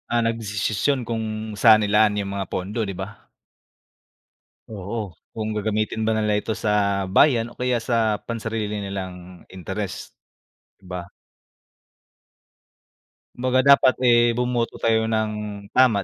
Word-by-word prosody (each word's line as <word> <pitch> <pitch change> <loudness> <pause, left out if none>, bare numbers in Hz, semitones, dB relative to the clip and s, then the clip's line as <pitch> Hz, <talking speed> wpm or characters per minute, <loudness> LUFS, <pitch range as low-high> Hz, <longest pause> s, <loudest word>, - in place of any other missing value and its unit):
Ah, 120 0 +2
nagdesisisyon 115 +3 -1
kung 110 -1 -4
saan 110 0 +6
ilaan 105 0 +3
yung 100 -1 -3
mga 100 -2 -4
pondo, 100 +5 -3
'di 100 -3 -3
ba? - - -8 1.4
Oo, 105 0 -5 0.2
kung 110 -1 -3
gagamitin 110 +1 -1
ba 110 - +2
nila 105 -1 +1
ito 105 +1 -2
sa 100 -1 0
bayan 115 +3 +4
o - - -17
kaya 125 -2 0
sa 115 -2 0
pansarili 110 -2 -3
nilang 95 -3 -7
interest, 95 +2 -6 0.6
'di 100 - -24
ba? 90 0 -5 2.3
Kumbaga 130 +1 +1
dapat, 140 -1 +6
eh, 120 -1 +4
bumoto 125 -1 -1
tayo 110 -1 +1
ng 110 -1 0 0.4
tama 120 -6 +4
110 Hz, 125 wpm, -23 LUFS, 100-115 Hz, 2.3 s, saan